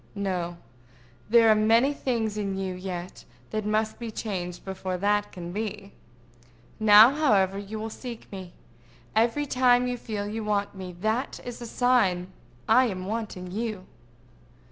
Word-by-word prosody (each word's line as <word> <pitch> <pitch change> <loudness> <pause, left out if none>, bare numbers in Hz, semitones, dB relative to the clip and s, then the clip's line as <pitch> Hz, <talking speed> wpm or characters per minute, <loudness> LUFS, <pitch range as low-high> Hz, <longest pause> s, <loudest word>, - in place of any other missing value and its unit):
No; 180 -4 -2 0.7
there 230 0 +6
are - - +8
many 225 +6 +4
things 230 -6 -1
in 200 -2 -2
you 190 -1 -2
yet 180 -1 -6 0.3
that 215 -1 -2
must 215 +1 0
be 235 -1 -5
changed 185 -5 -5
before 190 -1 -4
that 205 +2 +1
can 175 -2 -7
be. 205 0 -5 0.9
Now, 215 +3 +8
however, 200 -10 +2
you 205 +2 -6
will 220 +1 -5
seek 240 -1 -8
me. 185 -3 -8 0.6
Every 235 +6 +2
time 250 -2 +3
you 250 0 -2
feel 210 -3 -4
you 220 +1 -4
want 205 -1 -1
me, 185 -2 -8
that 220 +6 -1
is 245 -1 -7
a 240 - -6
sign 195 -8 +2 0.3
I 255 +4 +6
am 185 -4 -4
wanting 200 -4 -4
you. 215 -2 -4
210 Hz, 150 wpm, -26 LUFS, 190-230 Hz, 0.9 s, are